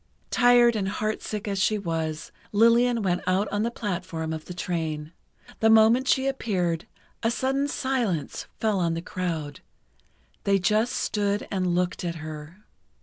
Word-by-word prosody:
Tired 240 -1 +5
and 195 -3 -1
heartsick 215 0 -3
as 200 -1 -1
she 210 +2 +2
was, 160 -4 -3 0.2
Lillian 230 +2 +4
went 180 -2 +1
out 190 +3 +2
on 205 +1 -1
the 230 - +1
platform 175 -7 -4
of 160 -1 -6
the 180 - -7
train. 160 -4 -3 0.5
The 220 - +4
moment 225 +4 +5
she 265 +1 +3
appeared, 185 -11 -1 0.3
a 225 - +2
sudden 270 +4 0
silence 245 - -2
fell 215 -3 +1
on 170 -2 +1
the 165 - -4
crowd—they 175 +3 -5
just 215 +6 +1
stood 205 -1 -1
and 185 -3 0
looked 180 0 -1
at 170 -1 -2
her. 155 +4 -9
195 Hz, 145 wpm, -26 LUFS, 170-225 Hz, 0.5 s, Tired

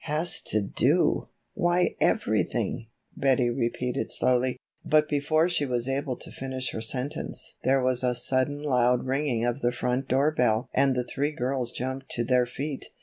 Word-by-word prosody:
"Has 160 +3 +2
to 110 -1 +1
do, 140 - +2 0.3
why 175 -2 +1
everything," 115 - 0 0.3
Betty 130 -3 +2
repeated 125 +1 -2
slowly. 125 0 +2 0.3
But 155 0 +3
before 155 +3 +2
she 175 -4 0
was 120 -1 -1
able 135 -1 -1
to - - -11
finish 130 -1 -4
her 110 - -5
sentence 130 +7 -4
there 135 0 +3
was 130 0 +2
a 125 -1 +1
sudden 130 +4 -1
loud 125 -3 +2
ringing 130 -3 0
of 120 +3 -1
the 120 - +2
front 125 +2 -1
door 135 +4 +3
bell 120 -5 +1
and 135 -2 +3
the 125 - 0
three 140 +4 -1
girls 130 -3 -2
jumped 130 +2 -4
to 120 - -1
their 125 0 +2
feet. 135 +3 -5
130 Hz, 165 wpm, -27 LUFS, 125-145 Hz, 0.3 s, But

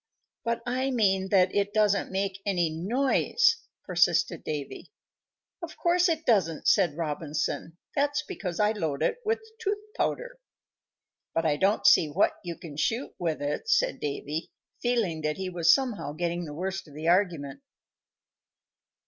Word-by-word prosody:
"But 235 0 -1
I 255 +2 0
mean 195 -6 +2
that 185 -2 +4
it 205 +1 0
doesn't 210 -3 +2
make 195 0 -2
any 175 -5 +1
noise," 270 - +2 0.3
persisted 175 -2 +2
Davy. 145 -2 -5 0.7
"Of 340 -2 -8
course 350 +1 +3
it 325 -1 -1
doesn't," 180 -9 +2
said 175 -7 +3
Robinson. 155 +1 -3 0.2
"That's 290 +1 +1
because 180 -3 -5
I 210 0 +4
load 160 -10 -2
it 485 - 0
with 445 +1 0 0.2
tooth 415 -2 -1 0.2
powder." - - -2 1.0
"But 165 0 +1
I 150 -2 +3
don't 195 +7 +1
see 160 - +7
what 165 +7 +2
you 170 -2 -5
can 150 -4 -10
shoot 230 - -1
with 160 -4 -2
it," 145 +1 -3
said 140 - +2
Davy, 150 +2 -4 0.3
feeling 225 -10 0
that 150 0 -1
he 190 -1 -4
was 170 -1 +4
somehow 240 - 0
getting 175 +2 -2
the 145 -2 -8
worst 190 +2 -4
of 145 - -15
the 155 +2 -4
argument. 175 - +1
185 Hz, 150 wpm, -28 LUFS, 160-235 Hz, 1.0 s, see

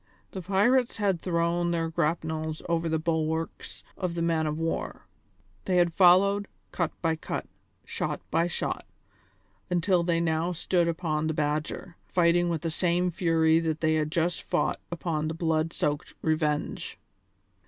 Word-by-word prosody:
The 190 - -5
pirates 210 +7 +2
had 195 -5 +1
thrown 170 0 0
their 165 -1 0
grapnels 160 -1 -2
over 170 -1 0
the 160 - +1
bulwarks 160 0 -2
of 180 -3 -3
the 170 - -1
man 165 -2 +1
of 150 +1 -2
war; 165 0 -3 0.6
they 185 -1 +2
had 175 -1 +3
followed, 200 +3 +5 0.2
cut 170 -3 -1
by 165 -1 +2
cut, 160 - -4 0.4
shot - - -3
by 170 - +2
shot, 175 - -3 0.8
until 180 +1 +2
they 170 -1 +1
now 165 +1 0
stood 175 +1 +1
upon 160 -2 -1
the 160 - -1
Badger, 155 +3 -2
fighting 175 0 +3
with 165 -2 -2
the 165 - -1
same 180 +1 +1
fury 165 -2 +3
that 160 -1 -2
they 160 -1 +3
had 155 -1 0
just 170 +1 0
fought - - 0
upon 160 -2 -2
the 160 - -3
blood 160 -1 0
soaked 145 -2 -2
Revenge. 155 -2 -1
165 Hz, 155 wpm, -27 LUFS, 160-175 Hz, 0.8 s, followed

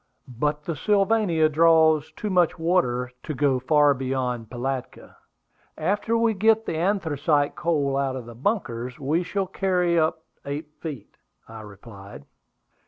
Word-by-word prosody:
"But 150 +4 -2
the 165 - -4
Sylvania 200 -4 +2
draws 160 -1 +4
too 210 - -4
much 180 -1 +2
water 125 -8 0
to 155 - -5
go 135 -1 +1
far 145 +2 +4
beyond 130 -3 -3
Pilatka. 130 +1 -5 0.6
After 205 +7 0
we 230 -1 +2
get 220 +2 +2
the - - -3
anthracite 155 -5 0
coal 145 -5 0
out 135 -1 -1
of 130 -3 -6
the 120 - -10
bunkers 125 - -3
we 150 +5 0
shall 195 +2 -2
carry 180 -2 +1
up 160 0 0 0.2
eight 145 +2 -5
feet," 150 -6 -8 0.3
I 110 0 -10
replied. 100 - -12
150 Hz, 140 wpm, -24 LUFS, 130-180 Hz, 0.6 s, draws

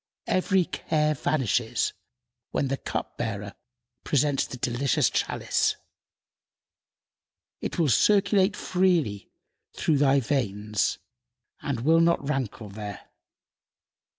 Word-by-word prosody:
Every 185 0 +2
care 155 -2 0
vanishes 125 -5 0 0.6
when 135 - -1
the 135 - -1
cup - - -5
bearer 105 -3 -3 0.5
presents 145 -1 +1
the 125 - -7
delicious 125 +2 +1
chalice; - - 0 1.9
it - - -4
will 165 -3 +3
circulate 200 - +3
freely 175 - 0 0.5
through 150 -3 +1
thy 140 -1 +4
veins 105 -6 -1 0.6
and 135 -6 -3
will 160 +5 +4
not 165 -4 +2
rankle 125 -7 -3
there. 100 -1 -8
140 Hz, 95 wpm, -26 LUFS, 115-160 Hz, 1.9 s, thy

